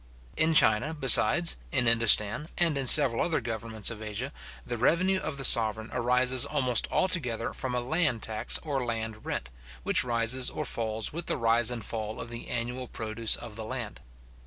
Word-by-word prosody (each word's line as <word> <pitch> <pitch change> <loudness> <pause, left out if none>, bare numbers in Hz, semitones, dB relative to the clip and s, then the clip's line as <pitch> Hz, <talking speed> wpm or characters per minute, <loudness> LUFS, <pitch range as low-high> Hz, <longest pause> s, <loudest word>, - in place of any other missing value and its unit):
In 160 +1 0
China, 110 +6 +3
besides, 160 +4 +3
in 130 -3 -1
Indostan, 115 +4 +3
and 170 -4 +1
in 135 -2 -3
several 130 -4 +8
other 165 - -1
governments 115 -2 -5
of 110 -2 -10
Asia, 110 +6 -6 0.3
the 120 - -5
revenue 185 +10 0
of 140 - -6
the 135 - -4
sovereign 110 -3 +6
arises 125 +1 +2
almost 125 -4 -1
altogether 125 -12 -3
from 125 -2 -5
a 125 - -2
land 140 -3 -2
tax 110 -1 -1
or 140 -4 -4
land 110 -2 -7
rent, - - -5 0.3
which - - +3
rises 120 +1 0
or 150 - -7
falls 110 -2 -3
with 170 +1 -7
the - - -2
rise 115 0 +1
and 120 -4 -5
fall 110 -1 -6
of 115 - -9
the 120 - -9
annual 125 +2 -5
produce 110 0 -2
of 105 - -11
the 110 - -8
land. 115 -1 -8
120 Hz, 180 wpm, -26 LUFS, 110-135 Hz, 0.3 s, several